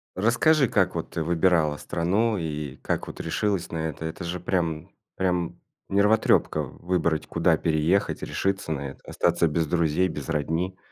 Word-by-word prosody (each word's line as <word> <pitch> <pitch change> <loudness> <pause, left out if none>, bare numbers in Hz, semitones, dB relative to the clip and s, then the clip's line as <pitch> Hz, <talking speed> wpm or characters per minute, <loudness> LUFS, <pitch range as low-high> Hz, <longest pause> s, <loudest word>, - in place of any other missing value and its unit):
Расскажи, 120 - +3
как 95 -4 +2
вот 80 - -3
ты 80 - -3
выбирала 80 -2 +2
страну 95 +9 0
и 75 -4 -4
как - - -2
вот - - -9
решилась 100 -4 -1
на 80 - -4
это? 80 +2 -7
Это 80 +2 -5
же 85 +1 -3
прям 85 -4 -1 0.3
прям 90 -2 -1 0.3
нервотрёпка 100 -6 +3
в 65 - -10
выбрать, 85 -4 0
куда - - +2
переехать, 80 +4 +1
решиться 95 -4 -1
на 70 -2 -3
это, - - -16
остаться 85 -1 +1
без 80 +1 0
друзей, 85 +2 +2
без 75 -2 -6
родни. 80 +5 -1
85 Hz, 160 wpm, -25 LUFS, 80-95 Hz, 0.3 s, Расскажи